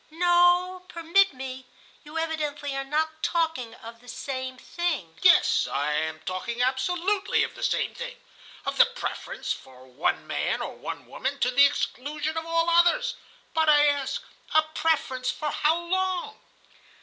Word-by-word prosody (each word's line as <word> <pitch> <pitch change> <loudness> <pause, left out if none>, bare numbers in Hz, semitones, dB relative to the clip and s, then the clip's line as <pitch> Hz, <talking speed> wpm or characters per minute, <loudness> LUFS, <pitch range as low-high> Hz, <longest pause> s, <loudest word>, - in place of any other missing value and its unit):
"No, 350 +2 +3
permit 340 +4 +3
me, 260 -1 -7 0.4
you 300 +2 -8
evidently 300 -3 -2
are 275 - -2
not 315 +3 -1
talking 320 -10 -1
of 230 0 -11
the 245 - -20
same 260 +1 -5
thing." 285 - -3
"Yes, 365 - +5
I 145 +2 0
am 155 +1 -2
talking 210 +6 -4
absolutely 355 +10 +1
of - - -4
the - - -11
same - - 0
thing. - - -7 0.5
Of - - -2
the 485 - +8
preference 480 +1 -4
for 130 0 -14
one 130 +4 -1
man - - -1
or - - -4
one - - -7
woman 275 +2 -3
to 250 - +3
the 280 +3 +7
exclusion 290 +2 -3
of 320 0 -3
all 330 0 +1
others. 340 0 +4 0.4
But 320 -1 +3
I 295 -1 +6
ask: 285 - 0 0.3
a 315 - +7
preference 265 -6 0
for 300 -1 -2
how 310 +2 +2
long?" 375 +4 -2
305 Hz, 155 wpm, -26 LUFS, 260-345 Hz, 0.5 s, the